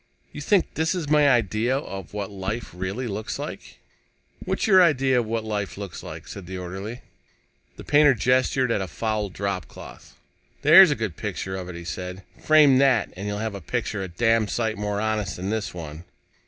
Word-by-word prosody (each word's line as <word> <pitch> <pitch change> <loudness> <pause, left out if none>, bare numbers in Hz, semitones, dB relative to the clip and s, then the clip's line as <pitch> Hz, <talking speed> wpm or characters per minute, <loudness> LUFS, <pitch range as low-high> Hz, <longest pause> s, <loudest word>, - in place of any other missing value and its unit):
"You 150 - -8
think 190 +5 +2
this 160 +3 0
is 165 -5 -4
my 150 -1 +5
idea 120 +1 +1
of 95 - -7
what 100 -1 -5
life 100 +4 -4
really 95 +8 -4
looks 105 -1 -4
like?" - - -8 0.7
"What's - - -1
your 190 -4 +6
idea 135 -6 +3
of 115 - -2
what 115 0 -2
life 105 -4 -4
looks 100 -4 -7
like?" - - -9
said 95 -3 -9
the 95 0 -6
orderly. 95 +6 -6 0.7
The - - -10
painter 145 -2 +5
gestured 130 +1 +2
at 105 - 0
a 95 - -3
foul 105 +4 -2
dropcloth. 100 0 -6 0.5
"There's 165 +5 +9
a 145 - +1
good 110 -8 -4
picture 95 0 -4
of 90 -1 -6
it," 90 - -7
he 85 0 -8
said. 90 +2 -6 0.2
"Frame 150 -4 +6
that, 135 -2 +3
and 100 +3 -6
you'll 105 0 -3
have 110 0 -3
a 100 - -7
picture 100 +5 -3
a 95 - -4
damn 115 +4 +1
sight 110 0 -1
more 105 0 -2
honest 110 -3 -1
than 95 +3 -4
this 110 -1 -2
one." 80 -2 -8
110 Hz, 195 wpm, -24 LUFS, 95-130 Hz, 0.7 s, There's